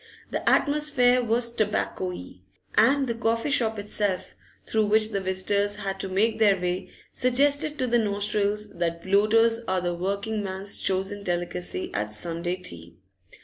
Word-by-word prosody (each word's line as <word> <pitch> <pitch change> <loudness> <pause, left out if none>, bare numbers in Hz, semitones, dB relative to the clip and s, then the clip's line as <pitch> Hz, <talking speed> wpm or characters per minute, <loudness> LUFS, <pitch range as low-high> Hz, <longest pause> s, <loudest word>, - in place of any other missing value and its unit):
The - - 0
atmosphere 285 -4 +3
was 235 +1 0
tobaccoey, 210 +4 -2 0.3
and 275 0 +4
the 235 - -2
coffee 230 +3 -1
shop 225 -4 +1
itself, 205 -2 -2 0.3
through 220 -1 +1
which 215 +1 +3
the 200 -2 -1
visitors 200 +2 0
had 195 -2 -4
to 195 - -4
make 215 +5 +1
their 200 -4 +4
way, 180 +1 -3 0.2
suggested 285 +4 +2
to 255 - 0
the 240 -1 +2
nostrils 210 0 0
that 170 -1 -2
bloaters 220 +4 +3
are 185 0 +1
the 175 -1 -2
working 200 +4 -2
man's 195 +1 -2
chosen 195 +2 -1
delicacy 175 0 -3
at 105 +1 -2
Sunday 170 +10 -3
tea. 85 - -8
205 Hz, 145 wpm, -26 LUFS, 185-230 Hz, 0.3 s, and